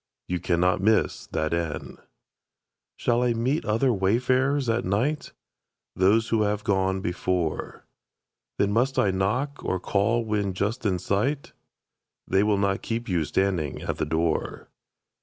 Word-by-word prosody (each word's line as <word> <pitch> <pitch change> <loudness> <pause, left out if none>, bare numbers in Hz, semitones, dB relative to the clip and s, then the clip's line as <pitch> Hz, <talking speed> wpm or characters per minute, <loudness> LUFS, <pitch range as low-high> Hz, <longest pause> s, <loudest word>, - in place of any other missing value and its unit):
You 90 0 -1
cannot 90 +2 +1
miss 110 +2 +1
that 80 0 -2
inn. 80 -4 -3 1.0
Shall 120 0 +1
I 125 -1 +2
meet 130 +7 0
other 115 +4 +2
wayfarers 130 +7 +1
at 115 +1 +1
night? 120 +11 -1 0.6
Those 105 +5 +3
who 110 -1 +2
have 105 0 0
gone 95 -1 +1
before. 90 -2 -2 0.7
Then 100 - +2
must 130 +5 +1
I 105 -7 +3
knock, 120 +10 -1
or 95 - -1
call 110 +5 +1
when 105 -3 -1
just 110 +5 -1
in 95 -2 +1
sight? 110 - -1 0.7
They 95 - +3
will 105 -1 +2
not 100 -1 0
keep 115 +1 -3
you 85 -6 0
standing 85 -3 -1
at - - -3
that - - -2
door. 80 0 -1
100 Hz, 140 wpm, -26 LUFS, 95-120 Hz, 1.0 s, Those